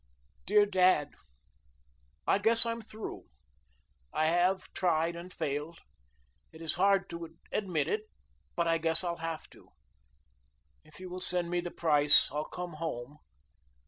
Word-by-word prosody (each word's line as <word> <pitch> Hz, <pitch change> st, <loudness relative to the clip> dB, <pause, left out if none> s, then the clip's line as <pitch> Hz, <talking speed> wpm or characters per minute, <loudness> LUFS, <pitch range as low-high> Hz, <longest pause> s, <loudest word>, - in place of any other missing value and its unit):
DEAR 205 Hz, +2 st, +4 dB
DAD: 185 Hz, -7 st, +2 dB, 1.1 s
I -, -, +2 dB
guess 230 Hz, +3 st, +5 dB
I'm 230 Hz, 0 st, -3 dB
through, 220 Hz, 0 st, -9 dB, 0.9 s
I 155 Hz, -, 0 dB
have 175 Hz, +4 st, 0 dB
tried 170 Hz, -2 st, 0 dB
and 175 Hz, +2 st, -9 dB
failed. 150 Hz, +2 st, -4 dB, 0.7 s
It 160 Hz, -, -14 dB
is 165 Hz, -1 st, -1 dB
hard 195 Hz, +1 st, +2 dB
to 165 Hz, -1 st, -9 dB
admit 185 Hz, -6 st, -1 dB
it, 430 Hz, 0 st, -2 dB, 0.5 s
but 170 Hz, -1 st, 0 dB
I 165 Hz, 0 st, +1 dB
guess 165 Hz, +1 st, +7 dB
I'll 170 Hz, -1 st, -3 dB
have 165 Hz, -1 st, -6 dB
to. -, -, -19 dB, 1.1 s
If 155 Hz, +2 st, -17 dB
you 185 Hz, -, -8 dB
will 180 Hz, +1 st, -7 dB
send 175 Hz, -1 st, +4 dB
me 175 Hz, -, 0 dB
the 175 Hz, -, -6 dB
price 150 Hz, -5 st, +3 dB
I'll 150 Hz, +2 st, -3 dB
come 175 Hz, -3 st, -7 dB
home. 145 Hz, -2 st, -6 dB
170 Hz, 145 wpm, -30 LUFS, 160-185 Hz, 1.1 s, guess